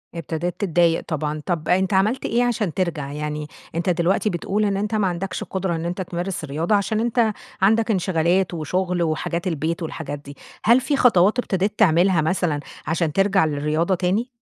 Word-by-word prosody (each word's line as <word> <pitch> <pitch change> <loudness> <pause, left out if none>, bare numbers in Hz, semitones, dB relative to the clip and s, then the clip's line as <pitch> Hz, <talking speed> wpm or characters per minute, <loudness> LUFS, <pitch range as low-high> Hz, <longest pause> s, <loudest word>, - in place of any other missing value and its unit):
ابتدت 165 +2 -3
تتضايق 170 -4 +2
طبعًا. 155 -1 -2
طب 170 -4 -2
أنتَ 190 +2 +2
عملت 215 +7 +2
إيه 240 +2 +2
عشان 215 -8 0
ترجع؟ 160 -7 -2
يعني 150 0 -4 0.3
أنتَ 170 +2 0
دلوقتي 180 +4 +1
بتقول، 200 +4 -1
إن 200 -1 0
أنت 210 +2 -1
ما 210 -3 +2
عندكش 185 +2 -3
قدرة 190 -2 -2
إن 165 +1 -4
أنتَ 180 +2 -3
تمارس 175 0 -4
الرياضة، 155 +8 0
عشان 210 +2 0
أنتَ 230 -1 +1 0.3
عندك 220 +3 +3
انشغالات 180 -1 +1
وشغل 175 +2 -1
وحاجات 170 +3 -2
البيت 165 +1 -2
والحاجات 155 -2 -5
دي. 140 0 -12 0.3
هل 240 +3 +5
في 290 - 0
خطوات 215 -1 +4
ابتديت 205 -2 -1
تعملها 180 -2 +4
مثلًا 160 -2 0 0.3
عشان 160 -1 0
ترجع 195 -1 +3
للرياضة 155 +4 0
تاني؟ 185 +7 0
180 Hz, 170 wpm, -22 LUFS, 160-200 Hz, 0.3 s, هل